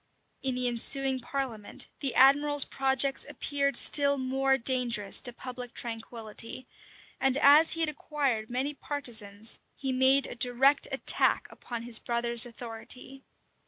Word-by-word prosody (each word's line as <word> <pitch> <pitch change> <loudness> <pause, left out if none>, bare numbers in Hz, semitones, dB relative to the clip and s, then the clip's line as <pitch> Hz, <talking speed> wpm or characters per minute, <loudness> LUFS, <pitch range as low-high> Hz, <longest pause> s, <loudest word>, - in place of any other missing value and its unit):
In 260 -2 -2
the 250 0 +1
ensuing 260 +3 +3
parliament, 245 -5 -4
the 275 -3 -1
admiral's 285 +2 +5
projects 270 0 +1
appeared 280 -3 -1
still 280 -1 +3
more 270 +1 0
dangerous 235 -5 +1
to 245 - 0
public 250 0 -10
tranquillity; 230 +1 -7 0.5
and 270 0 0
as 290 +3 +5
he 330 - -3
had 320 - +1
acquired 280 -7 -3
many 260 +4 -3
partisans, 225 -8 -1 0.2
he 270 -2 -4
made 260 +1 +3
a - - -7
direct 250 +4 +2
attack 270 - +1
upon 235 -2 -8
his 235 -2 +3
brother's 235 0 +1
authority. 245 +3 -8
260 Hz, 130 wpm, -27 LUFS, 235-275 Hz, 0.5 s, admiral's